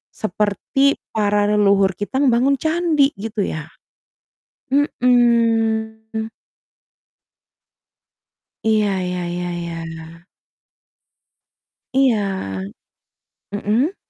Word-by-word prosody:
seperti 215 +7 +1 0.2
para 205 -1 +1
leluhur 200 -2 +4
kita 205 +9 -2
membangun 260 +1 +3
candi, 315 -3 +2
gitu 215 0 -2
ya. 155 -4 -4 1.0
Mhm. 225 -4 +1 2.3
Iya, 215 -1 +2
ya 180 0 -3
ya 175 0 -3 0.2
ya. 165 0 -8 1.7
Iya. 200 - +1 0.9
Mhm. 225 - 0
220 Hz, 65 wpm, -20 LUFS, 195-245 Hz, 2.3 s, leluhur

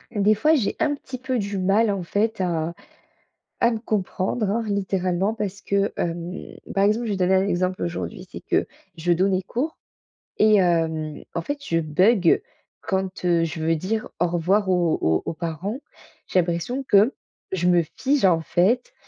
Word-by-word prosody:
Des 210 +1 +4
fois, 305 +9 +3
j'ai 225 -8 0
un 295 -2 +1
petit 260 -2 -8
peu 255 0 -2
du 200 -1 -3
mal, 200 +4 +3
en 195 -3 -2
fait, 210 +4 -1
à 170 -2 -1 0.9
à 235 - +4
me 225 - -2
comprendre, 210 0 -1
hein, 230 +2 0
littéralement. 195 -1 0
Parce 200 -3 -4
que, 200 0 0
hem, 170 0 -2 0.4
par 195 - +3
exemple, 215 +4 +2
je - - -1
vais - - -2
donner 185 0 +2
un 190 +1 +2
exemple 185 0 -1
aujourd'hui, 175 +2 -5
c'est - - -8
que - - 0 0.3
je 170 +2 0
donnais 185 +2 +2
cours 265 - -3 0.6
et 215 0 +5
hem, 160 -4 0
en 170 - 0
fait, 285 - -3
je 165 - +1
bugge 175 +4 +3 0.4
quand, 190 -3 -3
heu, 170 -1 +3
je 165 0 -3
veux 165 +1 +2
dire: 210 +7 -2
«Au 175 - +3
revoir» 185 +4 +1
aux 175 -3 +2
aux 80 0 +2
aux - - -2
parents. 170 - -4 0.5
J'ai 185 - +2
l'impression 175 +10 -1
que 215 +3 +5 0.4
je 180 -2 0
me 175 -1 +5
fige, 275 -3 +2
en 170 -3 +4
fait 200 +10 +1
190 Hz, 180 wpm, -23 LUFS, 175-215 Hz, 0.9 s, et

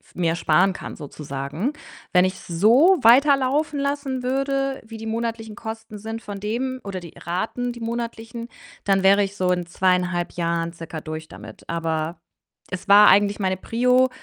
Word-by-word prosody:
f - - -26
mir 170 -2 0
sparen 175 +4 +3
kann - - -8
sozusagen. 145 - -4 0.4
Wenn 180 -1 +5
ich's 185 0 -3
so 235 - +5
weiterlaufen 280 +4 +4
lassen 280 -2 -2
würde, 275 +1 -1
wie 225 0 -9
die 225 - -7
monatlichen 225 -1 -3
Kosten 220 -1 -7
sind 225 +2 -6
von 205 -1 -7
dem 250 +6 -3
oder 195 -2 -5
die 170 -2 -12
Raten, 220 +8 -3
die 240 - -11
monatlichen, 230 0 -5 0.4
dann 195 -1 +2
wäre 200 +1 +5
ich 195 0 -6
so 185 -2 0
in 180 -1 0
2,5 180 0 0
Jahren 170 -1 -1
circa 165 -1 -7
durch 155 0 -6
damit. - - -12
Aber 165 0 -2 0.5
es 185 - -5
war 205 +1 +8
eigentlich 205 +1 +4
meine 190 -1 0
Prio, 250 +5 +2
205 Hz, 165 wpm, -23 LUFS, 180-240 Hz, 0.5 s, war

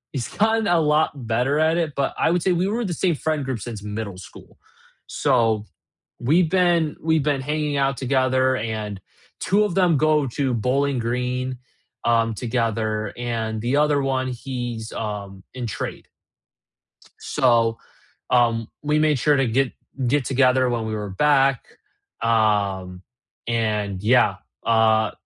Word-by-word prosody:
he's 125 -4 -2
gotten 220 0 +2
a 175 -1 +3
lot 150 0 +3 0.2
better 125 +6 +1
at 160 +1 +3
it, 165 -4 -1
but 140 -1 -1
I - - +3
would 175 -1 +1
say 190 - +2
we 180 +2 +1
were 225 +2 -1
the 175 - -2
same 175 0 +1
friend 155 -1 -2
group 130 -3 -3
since 110 -1 -7
middle 105 -2 -5
school, 95 - -14 0.5
so, 110 -2 +1 0.5
we've 155 +7 +2
been 175 -4 +2
we've 160 -1 +1
been 145 -1 0
hanging 150 0 -1
out 135 0 +1
together, 130 0 +1
and 105 -3 -4 0.4
2 205 +2 +2
of 195 -4 -2
them 180 -4 +4
go 150 0 +2
to 135 -3 +1
Bowling 135 +4 0
Green, 125 +2 -2 0.5
um, 115 -1 +2
together 110 -3 -2
and 115 -2 -3
the 125 +5 0
other 145 -1 +3
1 130 -1 0
he's, 120 -3 -5
um, 100 -3 -6
in 125 -2 -4
trade. - - -6 1.1
So, 115 -2 +2 0.5
um, 115 -2 +2
we 150 +1 +1
made 150 -3 +2
sure 145 +3 +3
to 135 - +2
get 130 +3 +1 0.3
get 140 +1 +1
together 130 -1 +3
when 115 -2 -2
we 110 - -3
were 105 -2 -4
back, 135 +4 +2 0.6
um, 100 -5 0 0.4
and 105 -4 -1
yeah, 110 -3 +4 0.3
uh, 110 -1 +3
125 Hz, 150 wpm, -22 LUFS, 110-150 Hz, 1.1 s, them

